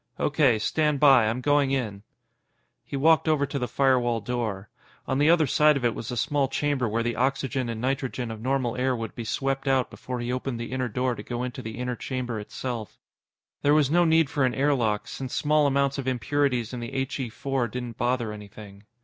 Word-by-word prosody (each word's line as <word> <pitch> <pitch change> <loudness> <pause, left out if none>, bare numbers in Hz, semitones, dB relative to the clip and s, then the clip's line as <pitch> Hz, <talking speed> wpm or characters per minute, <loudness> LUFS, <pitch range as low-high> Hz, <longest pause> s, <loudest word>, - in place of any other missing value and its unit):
"O.K. 140 -6 +3
Stand 150 +6 +1
by. 135 -6 +6
I'm 115 +4 -1
going 145 0 +3
in." 115 -7 -2 0.8
He 140 - -5
walked 160 +3 +4
over 150 -2 +3
to 140 0 -4
the 125 - -2
firewall 125 -2 +2
door. 110 -3 -3 0.4
On 130 - 0
the 150 +2 +4
other 165 -2 +5
side 150 +2 +4
of 125 - -2
it 120 - +2
was 115 - -6
a 125 - -4
small 140 +4 +1
chamber 135 -3 0
where 115 +2 0
the 120 0 -1
oxygen 130 0 -1
and 115 -1 -4
nitrogen 130 -2 -2
of 110 -1 -8
normal 130 -1 0
air 130 0 +1
would 115 -2 -5
be 120 - -6
swept 135 +4 -2
out 135 -2 +2
before 125 -1 -6
he 120 +1 -2
opened 130 -1 -3
the 115 - -5
inner 130 -1 -1
door 125 +3 0
to - - -7
go 120 0 -4
into 125 0 -5
the 110 -2 -7
inner 125 0 -2
chamber 125 -3 -4
itself. 115 +1 -6 0.6
There 145 +1 +4
was 150 -2 +3
no 175 +2 +5
need 160 -2 +4
for 140 0 -1
an 125 -2 +1
air 145 +2 +2
lock, 110 -6 0
since 130 -2 -5
small 150 0 +3
amounts 140 0 +1
of 135 - -4
impurities 130 -1 0
in 125 - -4
the 120 - -5 0.2
He 130 -2 -4
4 135 +1 -2
didn't 120 0 -6
bother 120 -2 0
anything. 105 -1 -12
130 Hz, 215 wpm, -26 LUFS, 120-140 Hz, 0.8 s, by